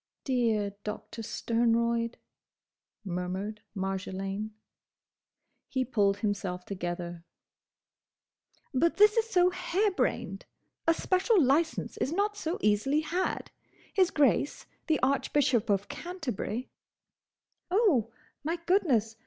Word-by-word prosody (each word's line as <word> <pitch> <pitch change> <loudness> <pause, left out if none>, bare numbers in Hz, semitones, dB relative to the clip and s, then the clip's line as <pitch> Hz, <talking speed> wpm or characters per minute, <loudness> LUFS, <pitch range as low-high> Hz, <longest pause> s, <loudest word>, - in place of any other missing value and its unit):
"Dear 225 -6 +1
Doctor 215 +2 -6
Sternroyd!" 230 +1 +1 0.9
murmured 190 +4 -3
Marjolaine. 195 +1 -3 1.2
He 260 -1 0
pulled 200 -5 +2
himself 195 -4 -2
together. 175 -2 -4 1.5
"But 330 +6 +2
this 420 +1 +7
is 455 -1 +1
so 360 -3 +4
harebrained! 370 +2 -1 0.4
A 330 - +5
special 385 +5 +3
licence 310 +3 +1
is 270 - -1
not 410 +4 +1
so 335 -3 -2
easily 215 +9 +2
had. 350 +4 -2 0.4
His 370 -3 +4
Grace, 280 - +2 0.2
the 315 -3 +2
Archbishop 265 -3 +2
of 200 0 +1
Canterbury—" 285 - -4 1.0
"Oh, 355 - +3 0.3
my 325 +3 0
goodness! 250 - +2
245 Hz, 95 wpm, -29 LUFS, 205-335 Hz, 1.5 s, this